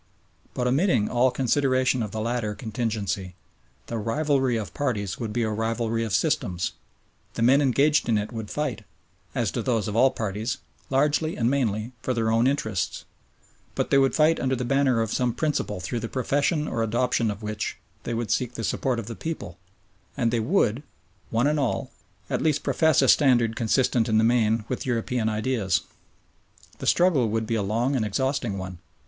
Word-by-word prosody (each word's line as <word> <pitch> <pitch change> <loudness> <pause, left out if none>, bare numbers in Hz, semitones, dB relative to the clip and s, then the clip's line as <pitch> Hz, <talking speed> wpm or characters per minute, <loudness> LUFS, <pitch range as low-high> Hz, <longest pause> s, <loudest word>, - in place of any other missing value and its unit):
But 125 - -1
omitting 135 - +2
all 125 +1 +3
consideration 130 0 +1
of 105 - -2
the 110 - -5
latter 115 -2 -2
contingency, 105 -5 -3 0.5
the 115 - -4
rivalry 130 +2 +1
of 105 -3 -5
parties 105 -7 -2
would 115 -3 -3
be 120 +2 0
a 110 - -1
rivalry 115 +1 -1
of 110 - -3
systems; 105 - 0 0.6
the 115 - 0
men 135 +4 +5
engaged 140 +1 +3
in 110 - +3
it 105 0 -3
would 110 -2 -5
fight 130 -8 -3 0.5
as 120 -6 0
do 120 - -2
those 115 -2 0
of 105 - -3
all 130 +4 +5
parties 110 +2 -3 0.3
largely 150 +4 +1
and 120 +1 +1
mainly 115 -4 0
for 130 - -1
their 110 -1 +1
own 115 +2 +3
interests, 110 -9 -1 0.7
but - - -1
they 140 - +6
would 135 -1 +2
fight 155 +1 +4
under 130 -1 0
the 125 0 -3
banner 135 -2 +2
of 110 -1 -2
some 125 -3 0
principle 150 -10 -1
through 95 +6 -3
the 115 - -5
profession 145 +4 0
or 115 - -2
adoption 115 +1 +1
of 105 +1 -5
which 105 0 -3 0.2
they 115 - -3
would 115 -1 -2
seek 125 -1 0
the 115 - -4
support 125 +3 0
of 115 - -4
the 115 +1 -6
people, 95 - -6 0.6
and 115 -2 +1
they 120 - +1
would, 120 - +1 0.5
one 115 +3 +1
and 150 +1 +2
all, 135 -4 -1 0.4
at - - -1
least 150 -2 +1
profess 160 -1 +3
a - - +3
standard 120 -6 +4
consistent 120 0 +1
in 110 - +3
the 110 - +4
main 115 -2 +2
with 125 - -3
European 120 -2 -1
ideas. 105 -6 0 1.0
The - - -5
struggle 160 -10 +3
would 110 +1 -1
be 115 - -2
a 110 - +1
long 115 +7 0
and 120 - +1
exhausting 125 0 -1
one. 95 -2 -6
120 Hz, 185 wpm, -25 LUFS, 110-135 Hz, 1.0 s, they